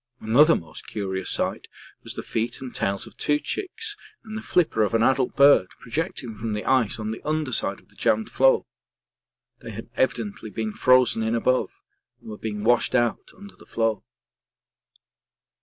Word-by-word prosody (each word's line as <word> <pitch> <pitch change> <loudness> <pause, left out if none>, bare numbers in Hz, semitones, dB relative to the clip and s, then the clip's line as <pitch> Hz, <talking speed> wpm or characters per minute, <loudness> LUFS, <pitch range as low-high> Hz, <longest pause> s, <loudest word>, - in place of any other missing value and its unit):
Another 140 +9 +5
most 80 -2 -8
curious 95 -3 -3
sight - - -1 0.4
was - - -7
the - - -5
feet 115 +3 -2
and 130 -2 -8
tails 100 0 -1
of - - -14
two 150 - +1
chicks 410 - -4 0.3
and 220 -1 -8
the 220 - -4
flipper 170 - +1
of 105 +2 +1
an 115 - +3
adult 130 0 +2
bird 140 -9 +6
projecting 125 -3 -4
from 110 -1 -3
the 105 - -4
ice 130 -6 +2
on 110 0 -3
the 110 - -6
under 155 -2 -1
side - - 0
of - - -26
the - - -24
jammed 110 0 +1
floe; 135 0 +4 0.9
they - - -9
had - - -8
evidently 110 -4 -1
been 110 +1 -4
frozen 125 -2 +4
in 110 +1 0
above 130 +2 0 0.4
and - - -10
were 105 - -7
being 105 -2 -4
washed 120 +2 +3
out 120 -4 +1
under 200 0 -13
the - - -18
floe. 115 -3 -1
115 Hz, 175 wpm, -24 LUFS, 110-135 Hz, 0.9 s, bird